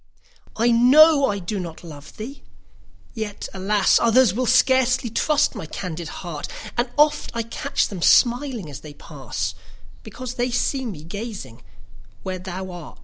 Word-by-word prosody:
I 235 +2 +3
know 280 +5 +6
I 200 - -1
do 195 +2 -4
not 170 -2 -7
love 150 -3 -12
thee! 260 +6 -8 0.7
yet, 215 -2 -5
alas! 195 +1 +2
Others 235 -3 +4
will 250 +3 -1
scarcely 255 -2 +3
trust 300 +6 +2
my 160 - -7
candid 170 -1 -6 0.2
heart; 160 -4 -5 0.3
And 240 +1 0
oft 300 0 +3
I 230 - -1
catch 275 +5 -1
them 190 -4 -7
smiling 245 - +3
as 145 -3 -8
they 150 -2 -12
pass, 120 - -5 0.5
Because 250 +3 -7
they 250 0 -1
see 260 +1 -1
me 165 -9 -7
gazing 190 - -7 0.6
where 185 -1 -4
220 Hz, 145 wpm, -22 LUFS, 175-255 Hz, 0.7 s, know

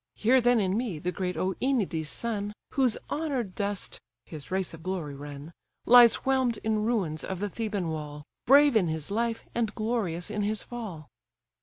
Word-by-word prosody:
Hear 250 +4 +4
then 245 0 +4
in 190 -2 +1
me 225 -7 -2
the 175 +4 -2
great 180 -1 -3
OEnides' 190 - 0
son, 205 +3 -2 0.2
Whose 255 -5 +2
honoured 270 -10 -2
dust 200 0 -3 0.3
(his 155 -4 -9
race 190 -1 -1
of 165 - -10
glory 175 -5 -3
run) 145 +3 -9 0.3
Lies 240 -1 +8
whelm'd 260 -4 +2
in 215 -1 +1
ruins 190 -10 0
of 190 - -4
the 205 +3 -2
Theban 205 -4 -3
wall; 150 -2 -5 0.2
Brave 285 0 +7
in 195 -6 +4
his 160 +1 -4
life, 230 +2 -1
and 225 -3 -1
glorious 215 -6 -2
in 210 -1 -2
his 210 +1 -1
fall. 205 -11 -7
205 Hz, 170 wpm, -28 LUFS, 170-235 Hz, 0.3 s, Lies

